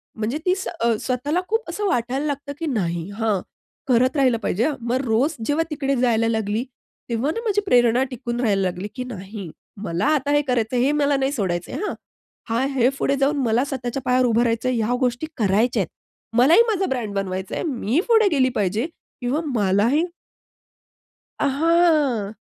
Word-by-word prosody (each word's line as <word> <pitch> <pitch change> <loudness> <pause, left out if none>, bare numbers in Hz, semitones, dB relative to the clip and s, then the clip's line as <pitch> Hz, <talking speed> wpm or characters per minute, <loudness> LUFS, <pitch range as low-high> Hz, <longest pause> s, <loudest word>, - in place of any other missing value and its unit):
म्हणजे 225 +6 -2
ती 365 - +4
स्व 385 - -4 0.2
अ, 230 - +3
स्वतःला 285 +8 -1
खूप 450 -4 -1
असं 410 +4 -2
वाटायला 260 -2 0
लागतं 285 -1 -3
की 330 - -3
"नाही, 175 - -2
हां 215 -5 +1 0.5
करत 255 +3 +3
राहील 255 -4 +4
पाहिजे," 220 +6 +1
हां. 300 - -1
मग 240 +2 -1
रोज 255 +8 +1
जेव्हा 295 +3 +1
तिकडे 275 -2 -1
जायला 230 -2 +2
लागली, 220 0 -1 0.5
तेव्हा 235 +6 0
ना - - -2
माझी 415 -1 +2
प्रेरणा 245 - +4
टिकून 240 -1 -4
राहायला 200 -5 +2
लागली 185 +2 -2
की 255 - -3
"नाही, 200 -5 -7 0.3
मला 170 +3 -1
आता 285 0 -1
हे 290 0 +4
करायचं 245 -1 0
आहे, 245 +1 +3
हे 285 - +3
मला 285 -1 +3
नाही 270 +1 0
सोडायच 185 - -2
आहे - - -5
हं." - - -2 0.6
हा 230 +3 +1
हे 250 -1 +4
पुढे 275 - +1
जाऊन 280 +2 +1
मला 230 +3 +2
स्वतःच्या 260 -1 -4
पायावर 255 0 +3
उभं 235 -1 +3
राहायचं 230 +2 0
आहे, 250 - 0
या 230 +2 +1
गोष्टी 250 +4 -1
करायच्या 220 +3 +2
आहेत. 170 - -3 0.5
मलाही 310 - +7
माझा 390 -3 +1
ब्रँड 240 - -3
बनवायच 190 -1 -3
आहे. - - -2
मी 265 - 0
पुढे 445 -3 +5
गेली 265 -5 +3
पाहिजे 210 +5 0 0.4
किंवा 265 +6 0
मलाही 215 - +2 1.3
अ, - - +1
हां. 290 - +2
250 Hz, 185 wpm, -22 LUFS, 220-285 Hz, 1.3 s, मलाही